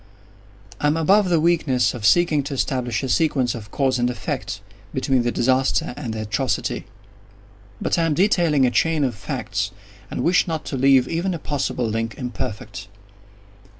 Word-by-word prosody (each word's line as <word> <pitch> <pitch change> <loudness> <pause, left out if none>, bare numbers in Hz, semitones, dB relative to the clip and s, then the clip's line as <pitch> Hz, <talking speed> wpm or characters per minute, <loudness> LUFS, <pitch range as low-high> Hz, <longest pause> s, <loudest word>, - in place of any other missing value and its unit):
I 145 - +1
am 150 +2 +2
above 190 +4 +3
the 170 -2 +3
weakness 155 -8 +2
of 110 -4 0
seeking 165 +1 +4
to 140 -1 -4
establish 125 -4 -1
a - - -1
sequence 130 -4 +1
of 105 -3 -8
cause 130 -3 0
and 120 0 +2
effect, 110 -5 -4 0.4
between 130 -2 +2
the 120 0 0
disaster 130 +1 +1
and 130 -6 -5
the 110 - -3
atrocity. 120 +5 -2 0.9
But - - 0
I 165 - +2
am 150 - 0
detailing 170 -7 +3
a 125 - +2
chain 160 +2 +2
of 130 -3 0
facts—and 100 -3 -5
wish 180 +2 +3
not 160 -2 -3
to - - -4
leave 135 -1 +4
even 175 +2 -1
a - - -3
possible 140 -5 -2
link 115 +1 -2
imperfect. 125 -6 -5
130 Hz, 165 wpm, -22 LUFS, 120-155 Hz, 0.9 s, seeking